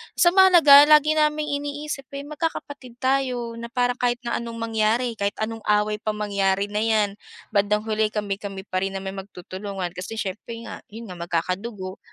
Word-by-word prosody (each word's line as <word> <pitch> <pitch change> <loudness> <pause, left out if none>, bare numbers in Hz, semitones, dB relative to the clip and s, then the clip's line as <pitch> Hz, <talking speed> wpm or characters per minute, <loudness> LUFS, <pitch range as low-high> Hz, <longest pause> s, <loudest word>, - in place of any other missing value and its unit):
basta 345 - +5
mahalaga 335 -7 +8
lagi 305 0 +5
naming 300 0 +1
iniisip 285 -1 -4
ay 280 - -5
magkakapatid 285 -4 -5
tayo 250 -3 0
na 235 - -6
parang 245 +1 0
kahit 245 0 0
na 235 - -1
anong 235 -1 -6
mangyari, 225 +2 +1
kahit 200 0 -1
anong 225 +1 -3
away 210 0 +2
pa 215 -1 -2
mangyari 200 -1 0
na 210 - -1
'yan, 215 -2 +1 0.3
bandang 210 +1 +1
huli 220 -1 +1
kami-kami 200 -2 -4
pa 185 -2 -2
rin 195 0 -3
naman 190 0 -4
'yong 195 - -9
magtutulungan. 185 0 -6
Kasi 185 +5 -7
siyempre 220 +3 -5
nga, - - -8
'yon 220 -2 -10
nga, 175 - -9
magkakadugo, 185 +3 -3
220 Hz, 175 wpm, -24 LUFS, 200-260 Hz, 0.3 s, mahalaga